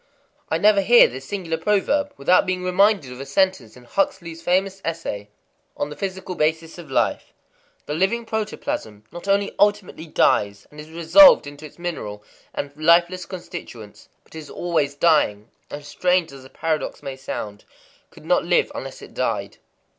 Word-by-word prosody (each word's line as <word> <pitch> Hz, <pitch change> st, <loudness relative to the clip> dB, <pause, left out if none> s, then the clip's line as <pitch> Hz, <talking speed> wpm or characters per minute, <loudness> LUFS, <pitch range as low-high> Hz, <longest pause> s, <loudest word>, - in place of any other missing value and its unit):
I -, -, +1 dB
never 210 Hz, -1 st, +4 dB
hear 235 Hz, +5 st, +7 dB
this 130 Hz, +2 st, -9 dB
singular 170 Hz, -4 st, -4 dB
proverb 210 Hz, -, +1 dB
without 185 Hz, -, +3 dB
being 185 Hz, 0 st, -2 dB
re 180 Hz, -, -1 dB
minded 195 Hz, -7 st, +3 dB
of 125 Hz, -, -10 dB
a -, -, -6 dB
sentence 140 Hz, -, 0 dB
in 125 Hz, -, -15 dB
Huxley's 170 Hz, +3 st, -2 dB
famous 190 Hz, +2 st, 0 dB
essay, 160 Hz, -12 st, -4 dB, 0.5 s
On 145 Hz, -, -3 dB
the -, -, -7 dB
Physical 190 Hz, +2 st, -5 dB
Basis 160 Hz, +1 st, -1 dB
of 165 Hz, -4 st, -11 dB
Life:—"The 135 Hz, +2 st, -4 dB
living 195 Hz, +8 st, 0 dB
protoplasm 210 Hz, -, -4 dB
not 175 Hz, +3 st, -9 dB
only 200 Hz, 0 st, +1 dB
ultimately 205 Hz, -5 st, +1 dB
dies 100 Hz, -8 st, +1 dB
and 150 Hz, -, -13 dB
is 150 Hz, +1 st, -10 dB
resolved 170 Hz, -, +7 dB
into 145 Hz, +2 st, -9 dB
its -, -, -21 dB
mineral 130 Hz, -13 st, -6 dB, 0.3 s
and 140 Hz, 0 st, -5 dB
lifeless 170 Hz, +3 st, +3 dB
constituents, 170 Hz, -, -10 dB
but -, -, -23 dB
is 160 Hz, -2 st, -9 dB
always 160 Hz, -5 st, -1 dB
dying, 140 Hz, -10 st, +2 dB, 0.2 s
and, 145 Hz, 0 st, -8 dB
strange 180 Hz, +3 st, 0 dB
as 135 Hz, -1 st, -12 dB
the 130 Hz, -, -14 dB
paradox 160 Hz, +1 st, -3 dB
may 135 Hz, -1 st, -5 dB
sound, 105 Hz, -6 st, -6 dB, 0.5 s
could -, -, -17 dB
not -, -, +2 dB
live -, -, +2 dB
unless -, -, -8 dB
it -, -, -13 dB
died." -, -, -2 dB
165 Hz, 165 wpm, -22 LUFS, 140-190 Hz, 0.5 s, hear